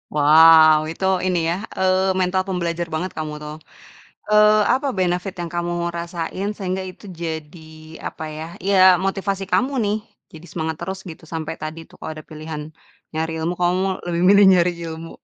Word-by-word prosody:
Wow, 155 +1 +7
itu 190 - -4 0.2
ini 180 -2 +1
ya, 170 - 0 0.2
eee, 190 0 +2
mental 185 +1 +1
pembelajar 170 -2 -2
banget 175 +4 -2
kamu 155 -1 -4
tuh. 150 0 -7 0.7
Eee, 210 0 +6 0.2
apa 280 +2 0
benefit 180 +1 -1
yang 170 - -4
kamu 175 0 -1 0.2
rasain 170 +3 -4
sehingga 190 -1 -3
itu 185 - -18 0.2
jadi 160 0 -5 0.5
apa - - -8
ya 155 - -5 0.2
iya 200 0 +3 0.3
motivasi 195 0 -2
kamu 265 +3 +2
nih 205 0 0 0.4
jadi 160 +1 -12
semangat 160 -1 -3
terus 190 0 -4
gitu 160 - -11
sampai 160 0 -3
tadi 155 +1 -5
tuh - - -18
kalau - - -6
ada 155 - -10
pilihan 155 0 -6 0.5
nyari 160 +1 -2
ilmu 165 +2 -1
kamu 180 +1 +2 0.2
lebih 170 -1 -1
milih 200 0 +7
nyari 180 -1 +4 0.2
ilmu? 165 +1 -7
175 Hz, 165 wpm, -21 LUFS, 160-190 Hz, 0.7 s, Wow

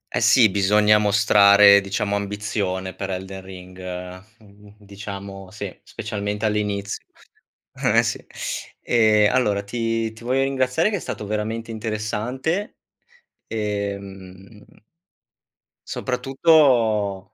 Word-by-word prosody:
Eh 125 - 0
sì, 115 0 +6
bisogna 105 +2 +4
mostrare 100 -1 +6
diciamo 100 +1 -2
ambizione 100 -2 -3
per 95 +2 -6
Elden 95 +1 -5
Ring, 95 -1 -12 0.6
mhmm, 105 -1 -19
diciamo 100 -2 -9
sì. 100 -1 -7
Specialmente 105 -1 -4
all'inizio. 105 -1 -2 0.7
Eh, - - +2
sì. - - -3 0.6
Ehm, 110 -2 +3
allora 105 -6 +1
ti 115 +1 -2
ti 115 +1 -14
voglio 130 +2 +1
ringraziare 135 +7 +1
che 205 - -1
è - - -5
stato 105 - -6
veramente 110 +2 -3
interessante, 115 - -3 0.7
ehm 100 -1 -6 1.2
soprattutto 125 - +2
105 Hz, 100 wpm, -22 LUFS, 100-115 Hz, 1.2 s, sì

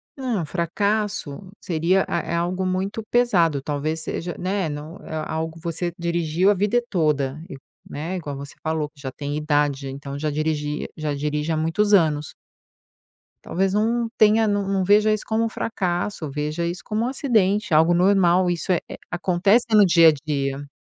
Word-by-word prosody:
Não, 250 -9 -2
fracasso 195 0 -1 0.2
seria, 175 +3 +1
a 170 - 0
é - - -5
algo 180 +2 -1
muito 190 +4 -2
pesado, 175 - +3
talvez 150 +3 -2
seja 175 +2 -4
né, 190 0 -1
não 150 +2 -7
é - - -8
algo, 160 +1 -4
você 170 +1 -3
dirigiu 170 +1 +1
a 205 - +4
vida 210 +5 +1
toda, 150 -5 0
e 185 - -8 0.3
né, 160 +6 -5
igual 150 -6 -5
você 140 +1 -9
falou 155 -1 -1
que 150 -1 -24
já 135 -1 -5
tem 145 +2 -4
idade, 145 -2 0
então 140 +1 -7
já 150 +1 -2
dirigia 150 0 -2
já 155 -2 -2
dirige 150 +2 -2
há 160 - 0
muitos 165 +7 +1
anos. 155 -6 +3 1.1
Talvez 190 +1 0
não 230 +3 +1
tenha 220 +1 +5
não 205 -1 0
não 195 -1 +1
veja 210 +3 +4
isso 215 - -3
como 220 +1 0
um - - -1
fracasso, 180 -6 -2
veja 150 +4 -2
isso 175 +2 -4
como 215 +2 -1
um - - 0
acidente, 215 - +1
algo 160 +3 +5
normal, 180 0 +4
isso 175 +1 -1
é 175 - +3
é - - -7
acontece 185 +6 +2
no 210 -2 +7
dia 170 -2 +7
a - - +5
dia. 140 -1 -2
170 Hz, 175 wpm, -23 LUFS, 150-200 Hz, 1.1 s, no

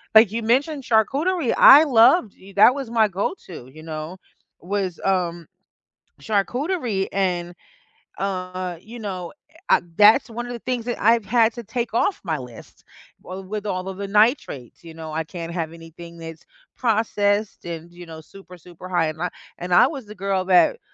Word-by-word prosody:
like 220 -2 +7
you 230 +1 -3
mentioned 275 +5 +1
charcuterie, 275 - +1
I 290 +3 +9
loved 235 - +4 0.2
that 215 +5 +7
was 270 -5 -5
my 225 -2 +3
go-to, 185 - -5
you 155 - -13
know, 160 +2 -7 0.4
was, 190 -1 -3
um, 175 -3 -1 0.8
charcuterie 230 - -1
and, 180 -3 -1 0.7
uh, 185 -2 -4
you 225 +6 -11
know, 185 -5 -6 0.4
uh, - - +5 0.2
that's 215 +6 +6
one 240 +1 -5
of 245 - -6
the 240 - -6
things 245 -1 -3
that 240 - -3
I've 230 +1 +4
had 225 +2 +3
to 235 - -7
take 230 +1 -4
off 390 - +1
my 160 -4 -1
list. 125 -4 -12 0.4
Wi 185 +1 -8
with 210 +1 -5
all 185 -2 -3
of 190 - -6
the 200 -1 -5
nitrates, 210 - 0
you 165 - -10
know, 160 -1 -8
I 160 +1 -1
can't 165 +1 -7
have 165 -2 -4
anything 170 +1 -12
that's 165 -1 -10 0.3
processed 210 -3 0
and, 170 0 -7
you 175 0 -12
know, 160 -1 -10
super, 180 +2 -15
super 175 +1 -12
high 175 -3 +1
in 155 - -10
ni 180 - -1 0.3
and 180 0 -6
I - - +7
was 275 -7 -7
the 210 - -10
girl 195 0 -1
that 190 - +4
195 Hz, 175 wpm, -22 LUFS, 175-230 Hz, 0.8 s, I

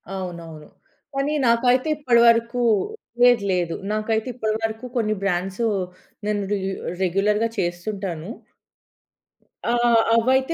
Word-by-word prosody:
అవునవును. 170 -4 -7 0.4
కానీ 275 +2 -1
నాకైతే 245 +4 +3
ఇప్పటివరకు, 235 -2 +3 0.6
లేదు 245 -4 +6
లేదు 175 -2 0 0.2
నాకైతే 220 +2 -1
ఇప్పటి 220 -3 -2
వరకు 225 +2 -3
కొన్ని 215 -2 +1
బ్రాండ్సు 195 +4 -1 0.6
నేను 210 -1 0
రె 205 - +2 0.5
రెగ్యులర్‌గా 210 +5 +1
చేస్తుంటాను. 175 0 -3 1.4
ఆహ్, 240 -1 +4
అవైతే 260 +6 +2
220 Hz, 95 wpm, -23 LUFS, 190-240 Hz, 1.4 s, లేదు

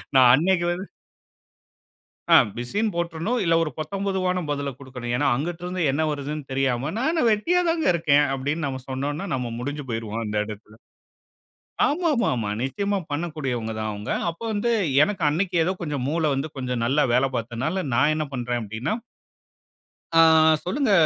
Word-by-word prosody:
நான் 130 -2 +8
அன்னைக்கு 175 +3 +2
வந்து 185 +2 -7 1.4
அ - - +8 0.2
பிசின்னு 205 - -1
போட்டுறணும், 170 +7 -1
இல்ல 165 -2 +2
ஒரு 155 - -3
பொத்தம்பொதுவான 185 +2 -1
பதில 140 -1 -1
குடுக்கணும். 125 -3 -6
ஏன்னா, 145 +4 +1
அங்குட்ருந்து 175 +5 -3
என்ன 140 +4 0
வருதுன்னு 150 +1 -4
தெரியாம 135 +1 0
"நான் 260 +6 +1
என்ன 330 - 0
வெட்டியாதாங்க 330 +8 +1
இருக்கேன்." 150 -4 +3
அப்டின்னு 145 +4 -2
நம்ம 130 -2 -4
சொன்னோன்னா, 145 +6 -3
நம்ம 125 -2 -2
முடிஞ்சு 145 +4 -4
போய்ருவோம் 115 0 -3
அந்த 105 0 -4
இடத்தில. 105 0 -10 1.1
ஆமா, 340 +5 0
ஆமா, 240 -2 +1
ஆமா. 110 -3 -2
நிச்சியமா 200 +10 -1
பண்ணக்கூடியவங்க 140 -8 -3
தான் 110 0 -2
அவுங்க. 105 0 -6 0.2
அப்ப 165 - -13
வந்து, 215 +3 0 0.3
எனக்கு 200 -2 -4
அன்னைக்கு 175 +4 -1
ஏதோ 180 - +1
கொஞ்சம் 145 -6 -2
மூளை 160 +1 +1
வந்து 135 +3 -2
கொஞ்சம் 125 -2 -2
நல்லா 145 +4 +3
வேல 130 +2 +4
பாத்ததனால, 125 +11 -2
நான் 145 +5 +4
என்ன 155 -1 -1
பண்றேன் 120 -1 -2
அப்டின்னா, 110 - -3 1.3
"ஆ - - +10 0.4
சொல்லுங்க! 260 +6 0
150 Hz, 150 wpm, -24 LUFS, 125-180 Hz, 1.4 s, ஆ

